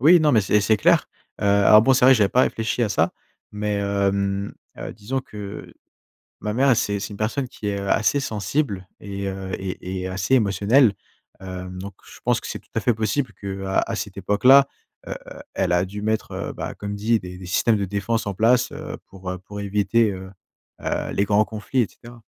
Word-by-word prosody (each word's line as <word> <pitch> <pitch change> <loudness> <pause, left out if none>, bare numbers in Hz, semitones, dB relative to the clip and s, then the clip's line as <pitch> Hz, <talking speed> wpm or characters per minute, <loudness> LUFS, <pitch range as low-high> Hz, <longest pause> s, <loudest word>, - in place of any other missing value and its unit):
Oui, 165 +6 +7
non, 150 -1 +3
mais 110 - +5
c'est 105 +1 +2
c'est 110 +2 +3
clair. - - +3 0.3
Heu, - - -2
alors 100 +1 +6
bon, 135 - +4
c'est 125 - +3
vrai, 130 +1 +8
j'avais 105 -4 +3
pas 125 - +3
réfléchi 115 +2 0
à 115 - +2
ça. 100 - +1 0.4
Mais, 105 0 -2
hem, 100 0 0 0.2
heu, - - -6
disons 120 +6 -3
que 105 -5 -9 0.7
ma 105 - -2
mère, 130 +2 +4
c'est 100 -2 0
c'est 100 - -5
une 100 - -8
personne 115 +6 -1
qui 110 - -7
est, 100 -1 -1
heu, 100 0 -4
assez 125 +8 +2
sensible 105 -4 -2
et 100 -1 -5
heu, 95 0 -5
et 95 0 -5
et 90 - -3
assez 95 +7 +1
émotionnelle. 105 +2 +4 0.5
Hem, 90 -1 -7
donc 100 +1 -7
je - - -14
pense - - +2
que - - -7
c'est - - -5
tout - - -28
à - - +2
fait 120 - +2
possible 110 +4 -1
qu'à 95 -1 -2
cette - - -5
époque-là, 135 +7 +5 0.4
heu, - - -6 0.2
heu, - - -10
elle - - 0
a 90 +1 +3
dû 105 +2 -7
mettre, 110 +1 -1
heu, - - -4
bah, - - -5
comme 105 0 -5
dit, 110 +2 +1
des 90 -1 -9
des 90 - -10
systèmes 110 +4 +2
de 100 - -1
défense 100 +4 -2
en 100 - -2
place, 115 +5 +3
heu, - - -7
pour, 95 -1 -8
heu, 90 - -4
pour 105 +2 -9
éviter, 105 +2 +2
heu, 95 0 -8 0.5
heu, - - -2
les 100 - +2
grands 105 +1 +3
conflits 110 +4 -1
et 115 - +1
cetera. 120 -1 -14
105 Hz, 215 wpm, -23 LUFS, 100-115 Hz, 0.7 s, vrai